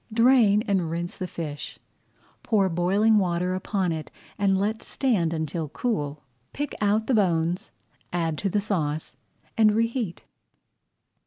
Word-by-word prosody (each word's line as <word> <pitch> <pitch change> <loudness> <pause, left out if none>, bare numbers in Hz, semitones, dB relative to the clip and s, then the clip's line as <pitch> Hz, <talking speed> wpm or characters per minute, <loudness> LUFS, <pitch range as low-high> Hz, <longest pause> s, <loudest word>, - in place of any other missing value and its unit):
Drain 230 -3 +5
and 190 -7 0
rinse 170 +1 -3
the 185 - -4
fish, 150 -4 -6 0.6
pour 200 -5 +2
boiling 195 +6 +3
water 180 -1 0
upon 185 -1 -1
it 160 -1 -4 0.3
and 195 -2 +2
let 215 +3 -1
stand 210 -12 0
until 160 -1 -3
cool. 150 - -2 0.3
Pick 290 0 -3
out 210 +2 +2
the 260 - 0
bones, 175 -4 +1 0.4
add 165 -2 0
to 200 - 0
the 205 +2 +1
sauce, 160 -7 -2 0.4
and 215 -2 +5
reheat. 230 -5 -1
190 Hz, 135 wpm, -25 LUFS, 165-215 Hz, 0.6 s, Drain